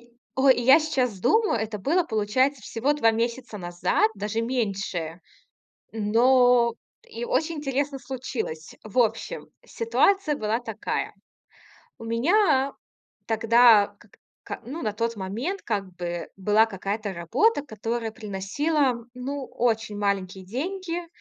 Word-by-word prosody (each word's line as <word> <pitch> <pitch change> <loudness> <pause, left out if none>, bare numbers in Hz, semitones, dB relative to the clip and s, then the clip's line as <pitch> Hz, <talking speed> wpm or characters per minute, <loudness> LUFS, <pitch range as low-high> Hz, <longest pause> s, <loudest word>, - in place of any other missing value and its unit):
И 240 0 -23 0.2
о 265 +1 +4
и 250 - +4
я 265 +6 +7
сейчас 255 -9 -1
думаю, 430 - +2
это 220 -1 -3
было, 330 - +2
получается, 255 +3 +1
всего 240 +8 0
2 230 -6 +3
месяца 235 0 -2
назад, 175 +3 +1
даже 210 +2 -2
меньше. 195 -8 -2 0.7
Но 235 +2 +4 0.3
и 230 - -7
очень 325 +6 0
интересно 280 -1 -2
случилось. 245 -12 -5
В 215 +2 -9
общем, 235 - 0 0.2
ситуация 395 -9 +1
была 220 -1 -1
такая. 225 -3 -4 0.9
У - - -9
меня 270 - +2 0.6
тогда, 225 -1 +5
как - - -21 0.3
ка - - -7
ну, 285 +7 -6
на 215 -2 -1
тот 230 +2 -2
момент 225 - -4
как 205 -3 -1
бы, 175 -1 -4
была 210 +3 +4
какая-то 200 0 -4
работа, 190 - +2
которая 225 -1 -3
приносила, 235 +6 -1
ну, 265 +2 -4
очень 225 -3 -1
маленькие 195 -2 -1
деньги. 345 - -4
230 Hz, 125 wpm, -25 LUFS, 210-270 Hz, 0.9 s, я